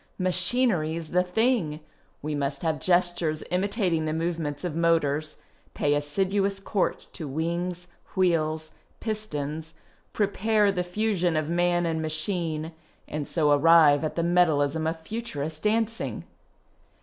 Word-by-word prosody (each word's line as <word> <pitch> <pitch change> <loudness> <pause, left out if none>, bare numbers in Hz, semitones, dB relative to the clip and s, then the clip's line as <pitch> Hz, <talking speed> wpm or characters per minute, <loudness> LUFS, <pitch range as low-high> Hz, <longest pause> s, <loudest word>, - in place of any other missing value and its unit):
Machinery's 180 -4 +1
the 180 +3 +3
thing! 180 -4 +1 0.2
" - - -38
We 150 0 -2
must 140 0 -2
have 160 -2 0
gestures 175 -3 +1
imitating 185 -3 0
the 155 - -1
movements 160 -3 -2
of 175 -4 -3
motors, 155 -2 +1 0.4
pay 145 - +2
assiduous 195 +7 0
court 195 0 -1
to 155 - -5
wings, 170 +4 -2 0.3
wheels, 160 -4 +1 0.3
pistons, 160 -8 -4 0.4
prepare 210 0 +2
the 180 -2 -1
fusion 180 -3 0
of 155 0 -1
man 175 0 +2
and 160 -1 -1
machine, 155 0 -2 0.4
and 150 -1 -4
so 150 -3 +2
arrive 150 0 +6
at 155 - -2
the 170 - 0
metallism 160 -3 +2
of 160 0 -2
Futurist 160 -7 -5
dancing. 225 +1 -1
165 Hz, 125 wpm, -26 LUFS, 155-185 Hz, 0.4 s, arrive